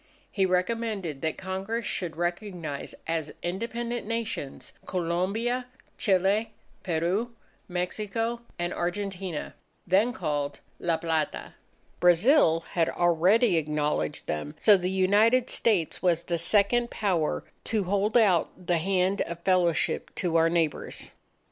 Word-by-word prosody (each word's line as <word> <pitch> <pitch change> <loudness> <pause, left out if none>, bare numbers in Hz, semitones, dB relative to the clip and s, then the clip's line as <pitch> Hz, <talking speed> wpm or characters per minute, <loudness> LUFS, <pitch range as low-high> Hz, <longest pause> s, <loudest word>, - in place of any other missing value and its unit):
He 195 -2 +2
recommended 185 -4 -1
that 160 -1 -1
Congress 195 +5 -3
should 175 -4 -3
recognize 175 -4 -4
as 160 -2 -2
independent 230 +5 -3
Nations, 230 -11 -4
Colombia, 195 +8 -1 0.3
Chile, 200 +3 +2 0.3
Peru, 185 +8 -1 0.3
Mexico, 215 +6 -2 0.2
and 175 0 -2
Argentina, 185 -2 -3 0.3
then 195 +7 +3
called 145 - -2 0.2
La 170 -2 +1
Plata. 160 -2 -2 0.5
Brazil 175 - +5
had 165 -2 +1
already 175 +5 +3
acknowledged 150 - -1
them; 75 -1 -4
so 210 - +6
the 180 -1 -1
United 210 +7 +3
States 195 -9 +1
was 170 -2 +2
the 170 -1 -2
second 210 +7 +2
Power 180 -7 0 0.2
to 215 -3 0
hold 200 +4 +1
out 190 -8 +4 0.2
the 175 -1 +2
hand 190 +2 +1
of 170 0 -4
fellowship 175 -3 +1
to 175 -3 -1
our 165 0 +5
neighbours. 165 -3 -1
185 Hz, 115 wpm, -27 LUFS, 165-215 Hz, 0.5 s, so